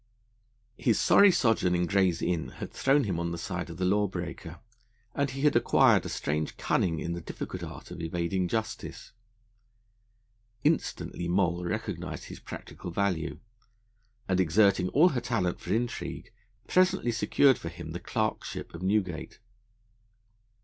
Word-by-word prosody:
His 115 - +2
sorry 200 -1 +7
sojourn 115 - +2
in 90 0 +1
Gray's 95 -2 +2
Inn 85 -2 0
had - - -6
thrown 140 +1 +3
him 95 -5 -2
on 85 0 -2
the 85 - -4
side 90 +1 -4
of 85 - -8
the 95 - 0
law 100 +2 +3
breaker, 85 -2 -6 0.5
and 140 -1 0
he 135 +1 -5
had 150 0 +3
acquired - - +4
a - - -5
strange 75 +1 -2
cunning 85 -3 +1
in 85 - -3
the 85 - -5
difficult - - -6
art - - -8
of - - -7
evading 85 +2 -1
justice. 110 +4 -4 1.5
Instantly 85 - 0
Moll 90 -1 +1
recognised 85 - -4
his - - -9
practical - - -8
value, 85 -2 -1 0.9
and, 95 -1 +1
exerting 95 +1 +3
all 160 - +5
her 130 -6 -2
talent 90 -7 -1
for 90 - -6
intrigue, 120 +1 -3 0.3
presently 185 -8 +3
secured 115 +4 +3
for 85 - -5
him 85 -1 -8
the 85 - -5
Clerkship 110 +4 -3
of - - -8
Newgate. 95 -3 -1
95 Hz, 150 wpm, -29 LUFS, 85-110 Hz, 1.5 s, sorry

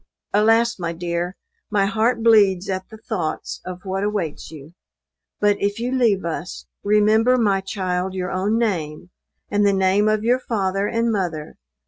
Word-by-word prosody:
Alas, 225 +2 +3
my 170 -1 -2
dear! 175 +2 -3 0.3
my 205 -3 +2
heart 225 +3 +1
bleeds 200 -5 +4
at 185 0 -4
the 220 - -11
thoughts 190 -8 -4
of 185 0 -7
what 190 +1 -2
awaits 205 -7 -3
you; 155 0 -12 0.7
but, 205 -1 +3
if 205 +2 -1
you 245 +2 -2
leave 230 -8 +2
us, 60 - -5 0.2
remember 215 +4 +4
my 200 -5 +2
child 185 -1 -2
your 180 -1 -3
own 200 +4 0
name, 175 -7 -2 0.4
and 205 0 +2
the 200 - +4
name 195 +2 +2
of 215 0 0
your 245 +3 +2
father 195 -4 -1
and 230 +1 0
mother. 175 -7 -3
200 Hz, 160 wpm, -21 LUFS, 180-220 Hz, 0.7 s, bleeds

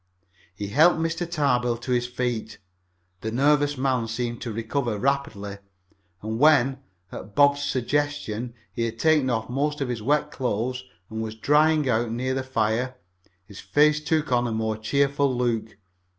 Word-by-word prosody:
He 100 +1 -5
helped 160 +11 +5
Mr. 165 +1 -2
Tarbill 125 -7 +1
to 125 - -4
his 120 0 +1
feet. 125 -3 -3 0.6
The 110 - -4
nervous 145 +3 +2
man 130 -3 0
seemed 120 +1 -3
to 120 - -4
recover 115 +1 -2
rapidly, 100 -6 -2 0.6
and 110 +1 -3
when, 135 -3 +4 0.3
at 105 - -9
Bob's 145 0 +4
suggestion, 130 -4 -2 0.2
he 115 - -1
had 115 0 -4
taken 150 -1 +3
off 110 -2 -1
most 145 +4 -1
of 135 -3 -2
his 120 -3 -3
wet 150 +5 +1
clothes 125 0 -2 0.3
and 110 0 -3
was 110 -1 -5
drying 150 +4 +3
out 120 -1 +1
near 130 +3 -1
the 135 - -1
fire, 125 0 -1 0.5
his 100 0 -12
face 150 +10 +3
took 155 -2 0
on 120 0 +2
a - - -3
more 110 0 -1
cheerful 140 +4 +1
look. 115 -3 -1
125 Hz, 160 wpm, -25 LUFS, 115-145 Hz, 0.6 s, helped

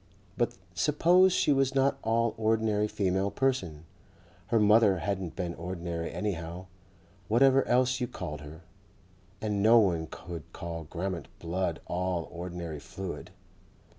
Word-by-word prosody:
But - - -1 0.2
suppose 170 - +4
she 165 - +2
was 135 -1 +1
not 135 +1 +2
all 115 +1 +1
ordinary 110 -1 +1
female 95 -1 0
person.... 95 - -1 0.6
Her 115 - +3
mother 105 -2 +5
hadn't 95 -1 -3
been 90 -2 -3
ordinary 85 -1 -4
anyhow, 90 -3 -4 0.6
whatever 135 +5 +5
else 125 +1 +2
you 125 - 0
called 75 -9 -6
her, 75 +3 -10 0.8
and 105 -2 -1
no 115 +3 +7
one 85 -7 +2
could 85 -4 -9
call 85 -1 -6
Grammont 90 +2 -4
blood 85 0 -2
all 90 -1 -2
ordinary 85 -3 -6
fluid. 95 +4 -7
95 Hz, 130 wpm, -29 LUFS, 85-115 Hz, 0.8 s, no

